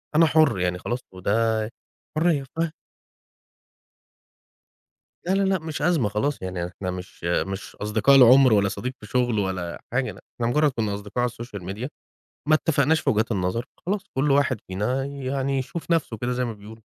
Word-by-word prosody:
أنا 165 +2 +7
حر 155 - +4
يعني 90 0 0
خلاص 120 +6 -2
وده 110 +3 0 0.5
حرية، 155 -4 +2
فه 165 -1 0 2.5
لا 180 - 0
لا 195 - +2
لأ، 190 -2 +2
مش 160 -2 -5
أزمة 150 -9 +2
خلاص 135 +8 -1
يعني 90 -2 -3
إحنا 90 +1 -5
مش 90 -1 -9
مش 95 +4 -2
أصدقاء 110 +6 +3
العمر 130 -1 +8
ولا 100 -1 +4
صديق 125 +6 -4
في - - -11
شغل 120 -2 +1
ولا 95 -3 -3
حاجة، 125 +2 0 0.3
إحنا 115 -1 0
مجرد 150 +3 +3
كنا 110 -4 -2
أصدقاء 105 +4 -4
على 125 - +2
الSocial 120 -5 -8
Media 120 +6 -4 0.6
ما 155 - +6
اتفقناش 155 0 +2
في - - +1
وجهات 115 +2 +1
النظر، 95 +5 -1 0.2
خلاص 200 +1 0
كل 135 +3 +1
واحد 135 -5 +2
فينا 105 +8 -1
يعني 135 0 -2
يشوف 160 +7 -5
نفْسه 160 -9 +1
كده 120 +3 -2
زي 125 0 0
ما 115 - -3
بيقولوا. 110 +1 -12
120 Hz, 170 wpm, -24 LUFS, 105-140 Hz, 2.5 s, العمر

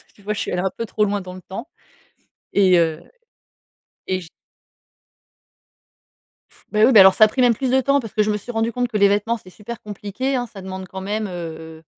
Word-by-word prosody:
Tu 205 - -21
vois, 210 +1 -2
je - - -5
suis - - -3
allée 180 - -1
un 190 - -1
peu 230 - -3
trop 210 -1 0
loin 200 0 -1
dans 180 0 -9
le 185 - -10
temps 225 - -8 0.9
et 185 -3 +5
heu, 160 -1 0 1.0
et 185 0 -1
je 165 - -12 2.4
Bah 215 0 +3
oui, 265 - +5
bah, 210 -5 +9
alors 190 0 +8
ça 215 - +7
a - - +2
pris 255 +4 -2
même 245 -2 +5
plus 260 +3 -2
de 265 0 +4
temps 280 +2 +2
parce 225 -5 -8
que 215 - +2
je 215 - 0
me 210 - 0
suis 245 +4 -8
rendue 225 0 0
compte 245 +1 -1
que 220 -3 -2
les 200 0 +6
vêtements, 210 +4 +1
c'est 185 - -16
super 220 +4 -9
compliqué, 210 +6 -4
hein. 245 -1 -1
Ça 195 - -10
demande 190 0 -7
quand 190 +1 -7
même, 210 +2 -2
heu, 160 -2 -8
205 Hz, 230 wpm, -21 LUFS, 185-230 Hz, 2.4 s, bah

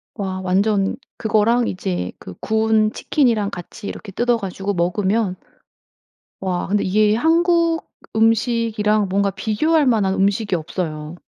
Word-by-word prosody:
와 190 -3 -4
완전 195 +2 +1 0.2
그거랑 225 +2 +2
이제 90 - -3
그 90 - -9
구운 220 -1 +2
치킨이랑 230 -7 +1
같이 200 +4 -8
이렇게 205 - -7
뜯어 240 +4 +1
가지고 195 -1 -4
먹으면 190 +3 0 1.1
와 185 -2 -2
근데 205 +1 +1
이게 210 +2 +3
한국 335 +4 +2 0.3
음식이랑 220 -2 +2
뭔가 200 +1 +1
비교할 290 - +1
만한 215 -6 +2
음식이 200 +1 +1
없어요. 155 -1 -4
210 Hz, 275 characters per minute, -20 LUFS, 190-225 Hz, 1.1 s, 이게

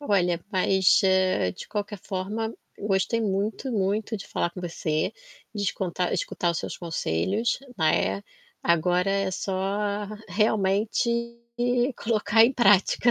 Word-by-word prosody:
Olha, 180 - +1
mas, 190 -1 +4 0.5
de - - -10
qualquer 205 -1 -4
forma, 210 +4 -3 0.3
gostei 200 +3 0
muito, 210 +5 -1
muito 210 +1 0
de 195 - -9
falar 175 - -1
com 180 - -9
você, 165 +1 -2 0.4
de 205 - -3
esconta 180 -2 -1
escutar 175 - -1
os 170 - -2
seus - - -5
conselhos, 175 - -1 0.2
né, 100 -11 +1 0.4
agora 175 +3 +2
é 195 -1 0
só 200 +2 -2 0.2
realmente 210 +3 +1 0.9
colocar 225 -1 +3
em 250 - +3
prática. 210 0 +4
195 Hz, 120 wpm, -26 LUFS, 180-215 Hz, 0.9 s, mas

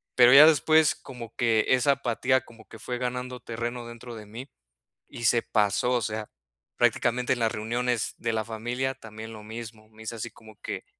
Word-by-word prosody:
Pero 125 +1 +7
ya 145 +3 +11
después 155 +1 +4
como 120 -4 -10
que 115 -2 +2
esa 130 +2 +4
apatía 130 0 +1
como 115 -3 -17
que 110 - -12
fue 125 +2 -4
ganando 125 0 -4
terreno 120 +1 -5
dentro 120 0 -9
de 110 - -9
mí 120 +6 -9 0.6
y 120 - -8
se 115 +1 +4
pasó, 105 +4 +1
o 125 - +2
sea, 110 -1 -4 0.5
prácticamente 125 +2 +2
en - - -8
las 115 0 +1
reuniones 120 +1 -1
de 115 -1 -2
la 110 - -1
familia, 120 +4 -3
también 110 -2 -10
lo 105 -1 -10
mismo. 110 0 -9
Me 110 0 -15
hice 115 +1 -5
así 115 +1 -5
como 110 -1 -16
que, - - -5
120 Hz, 190 wpm, -27 LUFS, 110-125 Hz, 0.6 s, ya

